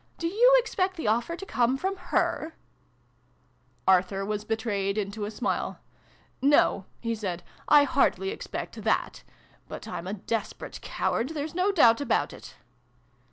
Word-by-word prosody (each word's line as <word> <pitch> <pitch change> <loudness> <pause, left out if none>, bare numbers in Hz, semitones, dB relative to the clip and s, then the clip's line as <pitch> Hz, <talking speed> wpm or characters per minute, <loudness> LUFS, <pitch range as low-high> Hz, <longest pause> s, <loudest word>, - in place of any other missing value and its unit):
Do 335 - -4
you 475 +8 +5
expect 380 -6 0
the 320 - -4
offer 235 +10 +1
to 390 - -8
come 250 -5 +1
from 380 +7 -2
her? 350 -3 -1 0.7
" - - -39
Arthur 190 +1 +3
was 210 0 -2
betrayed 210 -3 -1
into 205 0 -3
a - - -4
smile. 230 +3 -2 0.4
" - - -34 0.2
No," 195 - +2 0.2
he 230 -1 -1
said, 190 -6 -4 0.2
" - - -27
I - - +5
hardly 385 +6 +2
expect 435 - -6
that. - - 0 0.5
But - - -8
I'm 170 +1 -5
a 195 - -3
desperate 215 +2 -4
coward. 240 - -1
There's 310 -1 -4
no 365 +3 +2
doubt 240 -10 +5
about 285 - 0
it - - -12
235 Hz, 160 wpm, -27 LUFS, -, 0.7 s, you